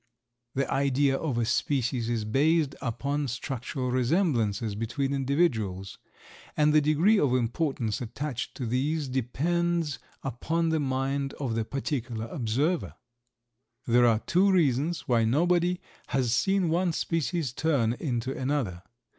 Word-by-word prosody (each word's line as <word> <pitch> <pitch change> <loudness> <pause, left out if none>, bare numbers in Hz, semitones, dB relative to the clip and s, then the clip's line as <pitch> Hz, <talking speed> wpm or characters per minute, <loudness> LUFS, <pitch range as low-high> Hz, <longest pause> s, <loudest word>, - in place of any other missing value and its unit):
The 135 0 0
idea 140 0 +2
of 135 -4 -2
a 120 - +1
species 120 0 0
is 115 -3 -1
based 145 +5 +2
upon 140 +3 -2
structural 125 +1 -3
resemblances 125 - +1
between 120 +6 -2
individuals, 120 - 0 0.6
and 150 0 +4
the 155 - +6
degree 160 +9 +3
of 130 -3 +2
importance 125 -2 -1
attached 125 +2 -4
to 125 - -4
these 140 +6 0
depends 160 +5 -1 0.2
upon 160 +6 -1
the 160 -1 +1
mind 135 0 -1
of 130 -5 -3
the 115 -1 -1
particular 125 -4 -3
observer. 140 +10 -1 0.9
There 120 0 +4
are 115 -2 +4
two 185 - +2
reasons 160 -1 +1
why 120 -2 +3
nobody 175 +8 +2 0.3
has 125 -4 0
seen 195 +4 +2
one 175 +1 +1
species 165 -4 -1
turn 135 -7 +1
into 125 -1 -3
another. 130 -10 -2
135 Hz, 130 wpm, -28 LUFS, 120-160 Hz, 0.9 s, the